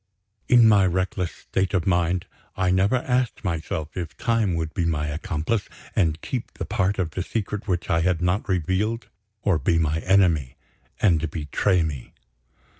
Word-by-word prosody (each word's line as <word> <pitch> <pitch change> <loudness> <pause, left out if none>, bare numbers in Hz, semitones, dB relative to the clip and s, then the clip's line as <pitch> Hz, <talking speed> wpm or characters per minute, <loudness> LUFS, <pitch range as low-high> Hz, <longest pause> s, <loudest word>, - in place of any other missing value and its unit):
In 120 -2 +7
my 100 -3 +5
reckless 90 0 -1
state 95 +1 -2
of 90 - +1
mind, 90 -1 +1 0.3
I 90 -1 +2
never 95 +6 +3
asked 125 -1 0
myself 80 -3 -3
if 85 -3 -5
Time 115 -6 +1
would 80 -1 -3
be 85 - -1
my 80 -3 0
accomplice, 80 +6 -2 0.3
and 80 -5 +2
keep 125 -3 -5
the - - -4
part 95 +2 0
of 85 -4 -1
the 90 - -3
secret 105 +2 -3
which 90 -3 -1
I 80 - +2
had 90 0 +1
not 90 +3 0
revealed 95 +6 0 0.3
or 95 -6 +2
be 85 +4 +2
my 80 -1 +1
enemy, 85 -9 +2 0.4
and 80 -5 +2
betray 85 +4 +1
me. 70 -6 -5
90 Hz, 165 wpm, -24 LUFS, 80-100 Hz, 0.4 s, In